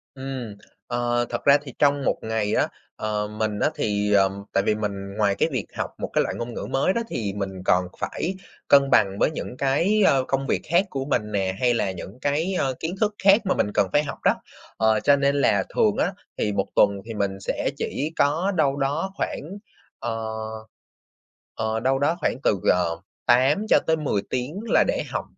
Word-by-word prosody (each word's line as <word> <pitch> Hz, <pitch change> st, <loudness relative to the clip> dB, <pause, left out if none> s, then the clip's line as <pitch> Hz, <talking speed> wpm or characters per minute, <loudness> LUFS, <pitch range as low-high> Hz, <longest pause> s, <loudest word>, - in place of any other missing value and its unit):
Ừm. 130 Hz, -5 st, -6 dB, 0.3 s
Ờ, 120 Hz, 0 st, 0 dB
thật -, -, -4 dB
ra 140 Hz, 0 st, +7 dB
thì 135 Hz, -4 st, -9 dB
trong 145 Hz, -1 st, +3 dB
một -, -, +2 dB
ngày 110 Hz, -2 st, -1 dB
á, -, -, +2 dB, 0.3 s
ờ, 105 Hz, -1 st, -2 dB
mình 105 Hz, 0 st, -2 dB
á, -, -, +3 dB
thì, 105 Hz, 0 st, 0 dB
ờm, 100 Hz, 0 st, +2 dB
tại 100 Hz, -, +2 dB
vì 105 Hz, -, +2 dB
mình 100 Hz, -2 st, -4 dB
ngoài 100 Hz, -2 st, +2 dB
cái 130 Hz, -, +1 dB
việc 125 Hz, -6 st, -2 dB
học -, -, -2 dB
một -, -, -3 dB
cái -, -, +3 dB
loại -, -, -3 dB
ngôn 120 Hz, 0 st, -5 dB
ngữ -, -, -5 dB
mới 135 Hz, +8 st, +2 dB
đó 235 Hz, -, 0 dB
thì 105 Hz, -, -3 dB
mình 95 Hz, -2 st, -4 dB
còn 90 Hz, 0 st, +3 dB
phải 185 Hz, +3 st, -3 dB, 0.3 s
cân 140 Hz, -1 st, +6 dB
bằng 100 Hz, -4 st, +3 dB
với -, -, +3 dB
những 125 Hz, -4 st, -6 dB
cái, 170 Hz, +11 st, +2 dB
a, -, -, +5 dB
công 135 Hz, 0 st, -1 dB
việc -, -, 0 dB
khác 175 Hz, +4 st, +4 dB
của 135 Hz, -4 st, -3 dB
mình 110 Hz, -7 st, -1 dB
nè, 95 Hz, -2 st, -1 dB
hay 125 Hz, -1 st, +3 dB
là 100 Hz, -4 st, 0 dB
những 95 Hz, +5 st, -9 dB
cái, 155 Hz, +7 st, 0 dB
a, -, -, +1 dB
kiến 165 Hz, +3 st, -3 dB
thức 210 Hz, -1 st, +1 dB
khác 200 Hz, +3 st, +6 dB
mà 190 Hz, -, +1 dB
mình 105 Hz, -, 0 dB
cần 100 Hz, -, +2 dB
phải 145 Hz, -, +3 dB
học 145 Hz, -, -6 dB
đó. -, -, +4 dB, 0.4 s
Ờ, 110 Hz, 0 st, +3 dB
cho 145 Hz, -, +4 dB
nên 140 Hz, 0 st, +1 dB
là 105 Hz, -8 st, +3 dB
thường -, -, +3 dB
á, -, -, +1 dB, 0.2 s
thì 105 Hz, -, 0 dB
1 100 Hz, -1 st, 0 dB
tuần 100 Hz, -1 st, +3 dB
thì 115 Hz, -, -6 dB
mình 100 Hz, -2 st, -2 dB
sẽ 95 Hz, -, -2 dB
chỉ 150 Hz, +3 st, -2 dB
có 160 Hz, +7 st, +2 dB
đâu 145 Hz, -5 st, +2 dB
đó 145 Hz, +7 st, -1 dB
khoảng, -, -, -3 dB, 0.6 s
ờ 115 Hz, -1 st, -3 dB, 1.2 s
ờ, 110 Hz, 0 st, -1 dB
đâu 130 Hz, +3 st, +1 dB
đó 145 Hz, +5 st, +1 dB
khoảng 150 Hz, -, 0 dB
từ, 100 Hz, -, +2 dB
ờ, 85 Hz, -2 st, 0 dB, 0.3 s
8 135 Hz, -, +4 dB
cho -, -, +6 dB
tới 160 Hz, -, +3 dB
10 140 Hz, -10 st, -1 dB
tiếng 130 Hz, +9 st, -3 dB
là -, -, +4 dB
để -, -, 0 dB
học -, -, -2 dB
120 Hz, 215 wpm, -24 LUFS, 105-145 Hz, 1.2 s, ra